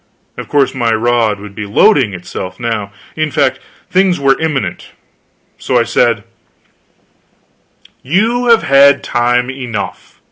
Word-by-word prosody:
Of - - -8
course, 140 -2 +1
my 120 -4 0
rod 115 -2 +1
would 105 0 -10
be 105 0 -6
loading 120 - +3
itself 90 +1 -7
now. 110 -4 -3 0.2
In 155 -1 -1
fact, 140 -2 0 0.3
things 185 -2 +2
were 135 -1 +2
imminent. 155 -5 -3 0.7
So - - 0
I - - +3
said: - - +1 1.8
"You 225 - 0
have 230 -1 +4
had 140 0 +4
time 125 +1 0
enough. 125 -6 -6
130 Hz, 130 wpm, -14 LUFS, 115-150 Hz, 1.8 s, have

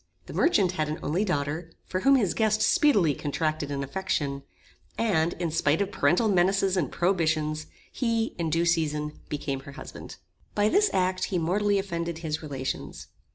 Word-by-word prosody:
The - - -9
merchant 200 - +3
had 155 -4 -2
an 155 - -2
only 170 +8 0
daughter, 160 -2 -2
for 185 - -2
whom 275 +8 +5
his 205 -10 +2
guest 220 -1 +2
speedily 275 - +4
contracted 155 +1 -2
an 140 -1 -2
affection; 140 -3 -2 0.6
and, 175 -7 +1
in 170 -2 -3
spite 155 0 +2
of 200 - -1
parental 175 +10 +2
menaces 195 0 +3
and 160 -8 0
prohibitions, 160 -4 0 0.2
he, 230 -3 0
in 165 -1 0
due 165 +2 +1
season, 150 -3 0
became 140 -2 -3
her 140 +1 -11
husband. 145 - -9 0.4
By 210 0 +3
this 410 - +4
act 185 0 +1
he 185 - -2
mortally 200 +5 +1
offended 170 -4 -3
his 160 -2 -3
relations. 135 -4 -5
170 Hz, 165 wpm, -27 LUFS, 150-195 Hz, 0.6 s, whom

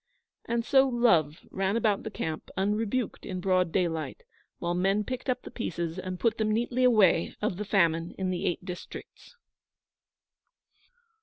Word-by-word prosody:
And 235 0 -1
so 270 +1 +5
Love 175 - +2
ran 195 +3 0
about 215 -4 +1
the 220 - -5
camp 160 -6 -5
unrebuked 210 +4 -1
in 185 -3 -4
broad 185 -2 +2
daylight, 170 - -1 0.3
while 170 0 -2
men 195 +4 +1
picked 255 +3 -5
up 255 - 0
the - - -9
pieces 170 -6 -3
and 185 0 -5
put 230 -1 +1
them 215 -1 +1
neatly 240 +3 0
away 210 -9 +4
of 210 -4 -1
the 210 - -4
Famine 170 -4 +1
in 185 -1 -1
the 180 - -2
Eight 175 - -2
Districts. 180 - -9
195 Hz, 155 wpm, -28 LUFS, 175-230 Hz, 0.3 s, so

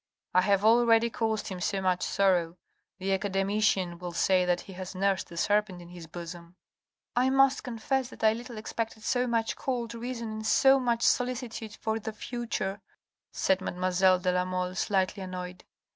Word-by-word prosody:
I 185 - +5
have 200 +1 +2
already 230 0 +5
caused 220 -2 -1
him 185 -2 -6
so 195 - 0
much 185 -1 +1
sorrow. 180 -3 +1 0.4
The 195 +1 -1
academician 195 -2 0
will 175 -1 -6
say 185 +1 +3
that 175 0 +1
he 195 - -11
has 185 +1 -7
nursed 195 -1 0
a 170 - -9
serpent 205 -1 +1
in 175 0 -12
his 175 -2 -10
bosom. 170 +1 -9 0.3
" - - -62
I 250 +2 +3
must 270 +1 +4
confess 250 +2 -2
that - - -12
I 220 0 +5
little 240 0 -8
expected 220 0 -4
so 250 +1 +1
much 230 -1 0
cold 240 -3 -3
reason 235 -1 -5
and 215 0 -4
so 270 +4 +5
much 235 -2 0
solicitude 245 -3 0
for 220 0 -2
the 220 0 -5
future," 220 -4 -4 0.5
said 190 0 +1
mademoiselle 185 0 +2
de 180 0 0
la 180 0 +1
Mole, 185 0 -2
slightly 190 +1 0
annoyed. 180 -1 -7
200 Hz, 175 wpm, -28 LUFS, 185-230 Hz, 0.5 s, I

